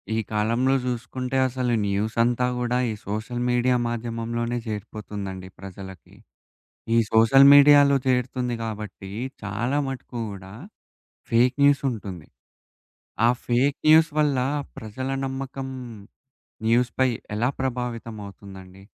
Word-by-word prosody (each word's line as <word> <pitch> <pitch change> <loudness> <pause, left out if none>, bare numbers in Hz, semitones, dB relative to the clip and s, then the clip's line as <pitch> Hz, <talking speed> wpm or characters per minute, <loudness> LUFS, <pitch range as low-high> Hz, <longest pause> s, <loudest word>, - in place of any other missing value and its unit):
ఈ - - +1
కాలంలో 115 +5 +1
జూసుకుంటే 125 +1 -3
అసలు 125 -1 -1
న్యూసంతా 115 +5 +1
గూడా 125 0 0
ఈ - - -3
సోషల్ 110 +4 -3
మీడియా 125 +1 +2
మాధ్యమంలోనే 115 0 -3
చేరిపోతుందండి 105 -3 -6
ప్రజలకి. 95 -2 -10 0.8
ఈ - - +5
సోషల్ 125 +5 +6
మీడియాలో 145 0 +7
చేరుతుంది 125 -1 0
గాబట్టి 105 -3 -7 0.3
చాలా 120 +7 -1
మటుకు 130 -2 -7
గూడా, 95 -1 -10 0.8
ఫేకు 125 +2 +3
న్యూసుంటుంది. 115 - 0 1.0
ఆ - - +5 0.2
ఫేక్ 130 +4 +1
న్యూస్ 160 +1 +6
వల్ల 145 -3 +2 0.4
ప్రజల 115 +5 -5 0.2
నమ్మకం, 135 0 -5 1.0
న్యూస్ 120 +2 +3
పై 130 0 +4 0.3
ఎలా 120 +4 +1
ప్రభావితం 120 -3 -4
అవుతుందండి? 95 -1 -12
120 Hz, 105 wpm, -24 LUFS, 105-130 Hz, 1.0 s, మీడియాలో